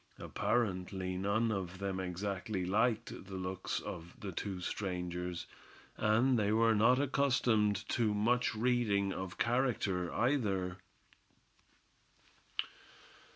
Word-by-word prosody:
Apparently 95 -5 -1
none 100 +5 +1
of 95 -3 -3
them 95 -1 -2
exactly 95 +1 -2
liked 110 +1 0
the 95 - -7
looks 95 0 -3
of 85 +1 -7
the 100 - -5
two 95 +2 -4
strangers; 90 -2 -3 0.5
and 115 +4 +3
they 105 0 +2
were 115 +1 +4
not 115 +5 +5
accustomed 125 -7 +2
to 115 -3 +2
much 115 +4 +2
reading 110 -4 +2
of 95 -1 -5
character, 115 -8 +1
either. 100 -8 0
100 Hz, 105 wpm, -34 LUFS, 95-115 Hz, 0.5 s, not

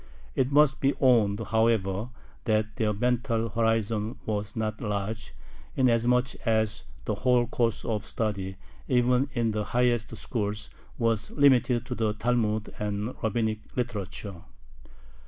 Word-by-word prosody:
It 130 0 +1
must 145 -1 +4
be 135 +1 +2
owned, 115 -6 +4
however, 110 -2 +1 0.4
that 110 -2 0
their 110 -2 +1
mental 115 +1 0
horizon 115 -1 0
was 105 -1 -2
not 110 -1 -2
large, 105 +1 -3 0.4
inasmuch 125 0 +3
as 110 -2 0 0.2
the - - 0
whole 125 -1 +3
course 115 -2 -1
of 105 -2 -1
study, 100 -4 -3 0.3
even 125 +2 +3
in 115 -2 +1
the 105 0 -1
highest 120 0 0
schools, 105 -2 -3 0.3
was 115 -2 +1
limited 130 -4 +3
to 125 - -4
the 110 -3 0
Talmud 110 -2 0
and 105 +3 -2
rabbinic 110 -1 0 0.2
literature. 100 -6 -4
115 Hz, 125 wpm, -27 LUFS, 105-125 Hz, 0.4 s, must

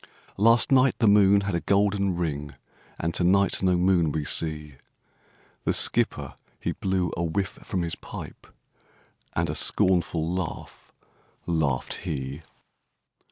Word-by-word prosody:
'Last 115 +5 +4
night, 130 -1 +4
the 115 - +2
moon 100 -1 +5
had 100 -1 -3
a 85 - 0
golden 100 0 +1
ring, 75 -4 -4 0.4
And 85 +1 -2
to 90 - 0
night 100 +3 +2
no 90 -1 +2
moon 90 -3 +2
we 75 0 -3
see!' 75 -3 0 0.9
The - - 0
skipper, - - +1 0.3
he - - -2
blew 95 -3 -2
a 85 - -2
whiff 95 +4 -3
from 90 -3 -3
his 85 0 -3
pipe, - - -10 0.9
And - - 0
a - - -3
scornful 85 -3 +1
laugh 90 -1 -6 0.5
laughed 80 -7 -1
he. 70 +1 -5
90 Hz, 135 wpm, -25 LUFS, 80-100 Hz, 0.9 s, moon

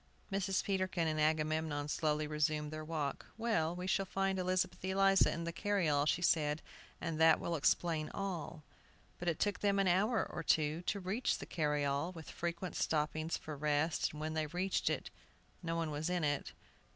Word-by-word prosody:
Mrs. 195 -1 0
Peterkin 185 -4 0
and 155 -1 0
Agamemnon 155 -1 +1
slowly 150 0 0
resumed 150 0 0
their 155 0 -5
walk. 155 -3 -3
"Well, 180 -8 +1
we 180 +1 -5
shall 195 +1 +1
find 195 0 0
Elizabeth 185 0 0
Eliza 195 +1 +4
in 170 - -3
the 170 0 -3
carryall," 165 -7 +1
she 175 - +1
said, 150 -2 +2 0.4
"and 165 -2 -3
that 160 -1 +7
will 170 - -2
explain 155 +1 +1
all." 170 -5 -4 0.6
But 175 - -5
it 165 -3 +1
took 205 -1 0
them 200 -1 +2
an 195 -1 +3
hour 210 +6 +3
or - - -5
two 155 +1 +2
to 200 - 0
reach 200 +7 0
the - - -7
carryall, 150 +1 0
with 165 -3 -9
frequent 170 +1 -4
stoppings 155 +1 0
for 155 - -7
rest, 150 +2 +1
and 150 - -9
when 155 +1 -3
they 155 -1 -1
reached 180 +5 0
it, - - -3 0.5
no 165 -2 -2
one 165 -2 -1
was 150 +3 -2
in 180 -2 0
it. 145 -1 -1
165 Hz, 180 wpm, -35 LUFS, 155-185 Hz, 0.6 s, that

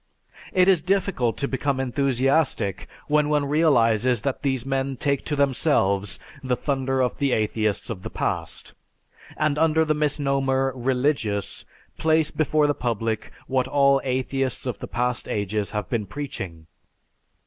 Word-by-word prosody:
It 185 0 +4
is 185 -4 +5
difficult 185 - 0
to 140 - -1
become 135 0 -1
enthusiastic 135 - 0 0.2
when 150 0 +2
one 150 -1 +2
realizes 125 -6 +3
that 135 +1 -2
these 130 -3 -1
men 135 0 -1
take 140 +1 0
to 150 - -1
themselves 120 - +1 0.2
the 130 -2 0
thunder 135 -2 0
of 125 - -1
the 140 -3 +2
atheists 110 -1 0
of 95 -5 -6
the - - -6
past, - - -4 0.6
and 150 -1 +1
under 160 0 +3
the 155 - +2
misnomer, 135 -3 0
"religious," 125 -5 -1 0.3
place 160 -1 +2
before 155 0 +2
the 145 - +2
public 115 -4 -2
what 130 -1 0
all 140 0 +4
atheists 130 0 -1
of 125 - -3
the - - -6
past 125 0 -2
ages 105 0 -1
have 105 -1 -3
been 110 -5 -2
preaching. 95 - -6
135 Hz, 145 wpm, -24 LUFS, 120-145 Hz, 0.6 s, is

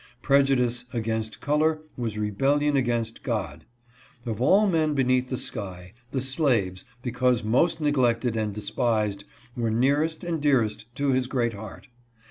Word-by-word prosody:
Prejudice 130 -3 +2
against 110 -1 -3
color 155 +1 +1
was 115 -4 -3
rebellion 135 +8 +1
against 120 -3 -1
God. 95 - -3 0.6
Of 115 -1 -3
all 195 +11 +5
men 160 -6 +1
beneath 130 -1 +2
the 130 - -2
sky, 95 -7 -6 0.2
the 130 - -2
slaves, 125 - 0 0.2
because 125 -1 +1
most 130 +11 +2
neglected 125 -5 +1
and 110 -2 -1
despised, 105 -1 -1 0.3
were 115 -2 -1
nearest 145 +8 +1
and 170 -3 -2
dearest 110 -7 +1
to 140 0 +1
his 130 -1 +1
great 120 -3 0
heart. 105 +5 -10
125 Hz, 135 wpm, -26 LUFS, 110-140 Hz, 0.6 s, all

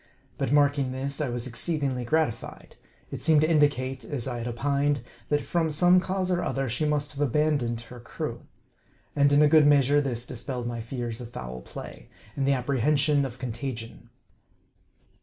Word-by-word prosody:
But - - -1
marking 145 -2 +3
this, 140 +3 -3
I 145 - -1
was 120 0 -3
exceedingly 135 0 -1
gratified. 155 -1 -2 0.4
It - - -5
seemed 155 -2 +4
to 155 - +3
indicate, 145 -4 +1
as 135 -5 -4
I 120 -2 -3
had 115 - -4
opined, 140 +3 0 0.3
that 145 -1 +1
from 165 -2 0
some 175 +4 +5
cause 185 0 -1
or 175 0 +1
other, 135 -4 -1
she 125 +6 -1
must 150 -1 0
have 140 - -10
been 145 - +2
abandoned 135 -4 0
of - - -13
her 125 +1 -11
crew. 120 - -6 0.7
And 140 0 +4
in 145 +1 +6
a - - +6
good 150 -1 +6
measure 145 0 +4
this 125 -4 -3
dispelled 125 0 -5
my 120 -1 -3
fears 120 0 -5
of 120 - -8
foul 65 - -7
play, - - -10 0.3
and 135 -1 0
the 140 - +4
apprehension 140 +3 +2
of 125 -2 -7
contagion. 120 -2 -6
140 Hz, 180 wpm, -27 LUFS, 120-150 Hz, 0.7 s, in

